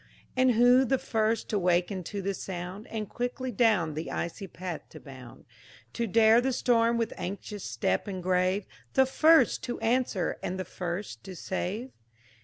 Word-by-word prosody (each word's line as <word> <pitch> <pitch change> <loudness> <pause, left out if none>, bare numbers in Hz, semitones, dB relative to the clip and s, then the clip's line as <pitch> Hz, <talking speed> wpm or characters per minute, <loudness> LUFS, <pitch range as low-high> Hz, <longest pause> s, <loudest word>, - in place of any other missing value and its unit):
And 255 -1 +4
who 245 +3 +6
the 265 +1 +2
first 225 -2 0
to 210 - +1
waken 180 +1 +1
to 200 +1 -5
the 200 +1 -1
sound, 185 +2 -6
And 215 -2 -4
quickly 245 +4 -3
down 200 -8 +2
the 155 +2 -5
icy 190 +4 -4
path 180 -2 -6
to - - -11
bound; 130 -4 -12 0.5
To 235 - -1
dare 225 +3 +5
the 265 +2 0
storm 235 -2 +2
with 230 -1 -1
anxious 200 +2 -6
step 105 - -1
and 185 -3 -5
grave, 185 +2 +1 0.3
The 265 - +6
first 315 +5 +4
to 245 - -4
answer 230 -5 0
and 185 +1 -3
the 185 - -3
first 180 +4 -5
to 190 -2 -8
save? 200 +8 -4
205 Hz, 170 wpm, -28 LUFS, 180-235 Hz, 0.5 s, who